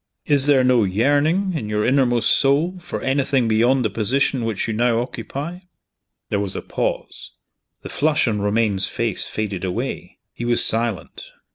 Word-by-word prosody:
Is 145 -2 +2
there 135 -3 +4
no 125 -3 +3
yearning, 145 - +1
in 115 -10 -4
your 105 0 -1
inmost 125 -3 +2
soul, 155 +7 +1
for 175 - -6
anything 135 -2 +1
beyond 120 +3 +2
the - - +1
position 120 +4 0
which 110 -2 -3
you 115 - -2
now 115 +1 +1
occupy?" 135 - -6 0.7
There 100 - +1
was 100 -2 -1
a - - -5
pause. - - -4 0.5
The - - -7
flush 150 -2 +1
on 105 -3 -1
Romayne's 105 -2 +1
face 115 -5 0
faded 100 -4 -4
away. 90 -1 -4 0.2
He - - -7
was 120 0 +4
silent. 115 -4 -2
120 Hz, 160 wpm, -21 LUFS, 110-140 Hz, 0.7 s, there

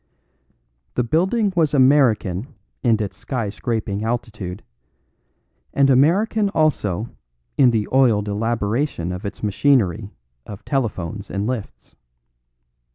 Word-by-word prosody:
The 125 - +1
building 190 - +1
was 160 -4 +2
American 130 -6 +2 0.3
in 115 -4 +2
its 100 -3 -3
sky 115 -2 -3
scraping 105 -2 -3
altitude, 110 -5 -4 1.1
and 140 -1 +4
American 200 - +3
also 115 - 0 0.5
in 130 - +5
the 110 -3 0
oiled 115 -6 +3
elaboration 110 - -1
of 90 +2 -5
its 100 - -9
machinery 105 -2 +1 0.3
of 100 +7 -10
telephones 105 - -3
and 100 +1 -2
lifts. 120 -3 -6
115 Hz, 105 wpm, -21 LUFS, 100-140 Hz, 1.1 s, in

